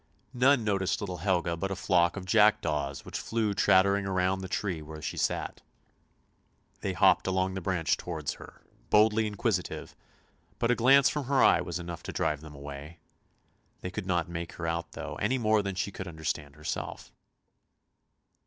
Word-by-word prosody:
None 130 0 +4
noticed 95 -3 0
little 95 -3 -4
Helga 85 -1 0
but 95 +4 -3
a 95 - -2
flock 90 -1 +2
of 95 - -6
jackdaws 95 -10 +2
which - - -5
flew 110 -2 -1
chattering 100 +1 +4
round 95 0 0
the 95 - -5
tree 95 -4 -2
where 80 +1 -9
she 75 - -4
sat. - - -2 1.2
They - - -2
hopped - - +4
along 95 0 0
the 95 - -4
branch 90 -2 0
towards 80 -4 -4
her, - - -14 0.3
boldly 110 +1 +4
inquisitive, 105 -2 -2 0.6
but 120 - +1
a - - +3
glance 135 +3 +6
from 150 -2 -1
her 135 +1 +3
eye - - +5
was 90 -1 -4
enough 85 -1 -6
to - - -6
drive 75 -1 -1
them 75 -2 -11
away. 70 +3 -9 0.8
They 90 - -5
could 95 -1 -5
not 85 -3 +1
make 85 -1 -6
her 80 - -6
out 85 0 -3
though, - - -6
any 130 - +1
more 110 -3 +3
than 100 -1 -4
she 95 +2 -2
could 95 0 -7
under 80 -2 -10
stand 75 -1 -3
herself. 75 0 -5
95 Hz, 175 wpm, -29 LUFS, 85-105 Hz, 1.2 s, glance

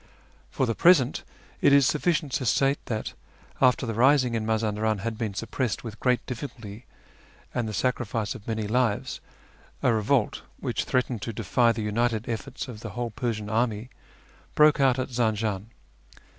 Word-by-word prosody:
For 130 - 0
the 115 - 0
present 165 -2 +4 0.4
it - - +5
is 140 -1 +6
sufficient 155 +1 +1
to 130 - -1
state 135 +5 +2
that, 110 -2 -3 0.5
after 130 0 +4
the 115 - -2
rising 130 +1 +4
in 110 -1 -1
Mazandaran 110 -1 0
had 115 +1 -3
been 110 -3 -3
suppressed 115 +1 -2
with 110 -2 -8
great 125 -2 +1
difficulty 115 -5 -7 0.7
and 115 -2 -1
the - - -3
sacrifice 115 -3 -1
of 100 - -12
many 110 -2 -2
lives, 115 0 0 0.6
a 125 - +4
revolt, 110 +2 +1 0.2
which - - -2
threatened 125 -3 0
to 115 - -4
defy 115 +3 +2
the 110 -1 -3
united 110 +1 0
efforts 120 +4 -4
of 120 -4 -8
the - - -7
whole 120 -1 -2
Persian 110 -3 -3
army, 110 +1 -1 0.6
broke 150 -1 +5
out 135 -2 +4
at 130 - -2
Zanjan. 110 -4 -1
115 Hz, 160 wpm, -26 LUFS, 110-130 Hz, 0.7 s, is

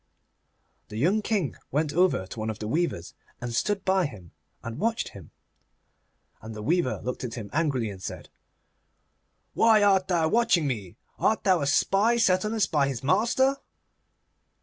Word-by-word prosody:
The 105 - -8
young 185 - +2
King 205 - -1
went 150 +1 -1
over 180 - +2
to 105 - -9
one 110 +1 -2
of 110 - -4
the 105 - -5
weavers, 135 - -2 0.3
and 120 -1 -5
stood 195 - -1
by 190 -3 +2
him 95 - -13 0.3
and 115 0 -6
watched 230 +2 -1
him. 95 -6 -13 1.1
And 110 0 -9
the 105 - -7
weaver 165 0 0
looked 125 +1 -4
at 120 -2 -5
him 110 -5 -7
angrily, 135 -8 0
and 95 -2 -11
said, - - -7 1.2
'Why 220 -2 +4
art 195 -2 +3
thou 170 -3 +2
watching 220 -8 +2
me? 110 -7 -4 0.2
Art 220 - +1
thou 185 -4 +3
a 140 - -1
spy 200 +10 +3
set 185 -5 +3
on 215 +1 -2
us 220 - +3
by 140 -3 +1
our 135 - -3
master? 235 - +2
160 Hz, 170 wpm, -26 LUFS, -, 1.2 s, Why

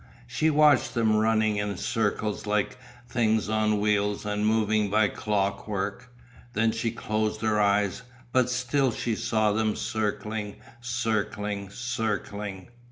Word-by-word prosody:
She 155 +6 +1
watched 150 -4 +4
them 110 -2 +3
running 110 -1 +2
in 100 -2 -2
circles 105 0 -1
like 105 +5 0 0.3
things 110 -4 +1
on 110 -1 +2
wheels 105 0 +1
and 105 0 -1
moving 110 -1 +2
by 105 0 +3
clockwork. 100 +2 -2 0.4
Then 115 0 +2
she 115 +1 -1
closed 110 -1 -2
her 110 -1 +1
eyes, 100 +1 +2 0.3
but 125 -1 +3
still 125 +1 +1
she 115 +1 -2
saw 110 -1 +1
them 110 0 +1
circling, 105 -1 -3 0.3
circling, 105 -4 -2
circling. 105 -4 -3
110 Hz, 125 wpm, -27 LUFS, 105-115 Hz, 0.4 s, watched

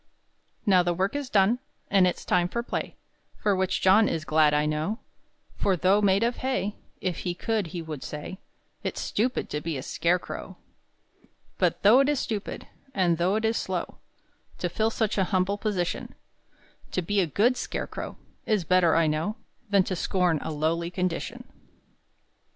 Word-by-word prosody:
Now 190 -4 +5
the 175 -1 0
work 190 +7 0
is 285 -3 -3
done, 210 +4 +3 0.3
And 195 -2 +5
it's 180 - -3
time 175 -1 +2
for 235 +4 -2
play, - - -4 0.4
For 205 -2 +1
which 190 0 0
John 205 +4 +5
is 160 -1 -2
glad 155 -1 +4
I 150 0 +2
know; 155 +8 -1 0.6
For 190 -2 +1
though 190 +5 +4
made 200 +1 +3
of 240 +1 0
hay, 255 -6 -1 0.3
If 185 -2 -2
he 175 -1 -3
could 215 0 -1
he 170 +1 -5
would 155 -4 -6
say, 150 +6 -6 0.4
"It's - - -3
stupid 245 +5 -1
to 150 - -2
be 160 -3 -3
a 130 - -5
scarecrow." 170 +5 -2 1.0
But - - +1
though 215 +6 +7
it 275 +1 +4
is 295 -3 +1
stupid, 210 -3 -4 0.3
And 175 -3 +2
though 180 +4 +2
it 220 +1 0
is 225 +1 +1
slow, - - -3 0.6
To 175 - -2
fill 220 +5 +1
such 220 -2 -1
an 190 - +3
humble 190 +2 0
position; 190 -6 -2 0.8
To 185 - 0
be 205 +4 +1
a 175 - +1
good 225 - +3
scarecrow - - -5 0.3
Is 210 -4 +2
better 175 0 +4
I 165 0 +4
know 155 +7 0 0.3
Than 200 -2 +5
to 185 - -3
scorn 180 -2 +1
a - - -4
lowly 160 +3 0
condition. 185 +7 -3
185 Hz, 175 wpm, -27 LUFS, 170-210 Hz, 1.0 s, though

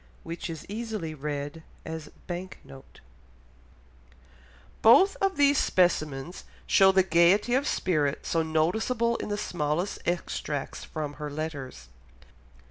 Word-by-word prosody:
Which 170 +1 -6
is 160 -2 -7
easily 215 -6 -4
read 145 +1 -5 0.2
as 160 -2 -6 0.2
Bank 180 +1 -6
note. 135 0 -15 1.8
Both 370 - +7
of 390 -1 0
these 285 -1 +4
specimens 160 -3 0 0.2
show 190 0 +6
the 190 0 +4
gaiety 180 +6 +4
of 270 +3 +2
spirit 150 -6 0
so 165 - +1
noticeable 220 +10 +1
in - - -5
the 205 - -1
smallest 175 -1 -2
extracts 150 -5 -3
from 150 -2 -5
her 150 - -3
letters. 145 - -6
170 Hz, 120 wpm, -27 LUFS, 150-205 Hz, 1.8 s, Both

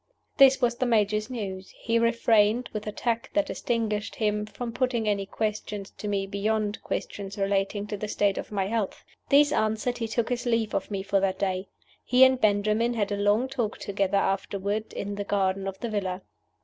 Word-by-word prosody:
This 270 -1 +7
was 240 -1 +2
the 255 - 0
Major's 215 -1 +2
news. 195 -6 -5
He 230 0 +1
refrained, 230 0 +3
with 215 - -2
the 210 - -3
tact 230 +4 -2
that 300 -1 +3
distinguished 225 -5 -2
him, 210 -1 0
from 235 +2 -5
putting 245 -2 0
any 200 -2 0
questions 210 -1 -3
to 210 - -4
me 200 -1 0
beyond 210 +1 -1
questions 200 0 -5
relating 200 +1 0
to 210 0 -4
the 215 - -4
state 205 -1 +1
of - - -7
my 195 -2 0
health. 215 -1 -2 0.2
These 290 +1 +6
answered, 220 0 0
he 230 - -1
took 230 +1 -1
his 245 0 -2
leave 230 -2 +1
of 195 - -1
me 195 -2 -3
for 200 0 +2
that 190 -1 0
day. 190 -1 -1 0.4
He 255 +1 +5
and 260 -1 +5
Benjamin 215 +3 +2
had 205 -2 -1
a - - +1
long 205 +5 +2
talk 245 -5 -2
together 200 0 0
afterward 200 +2 -1
in 205 0 -4
the 205 0 -3
garden 195 -1 0
of 195 0 -4
the 235 - -2
villa. 190 -3 -2
210 Hz, 195 wpm, -27 LUFS, 200-230 Hz, 0.4 s, This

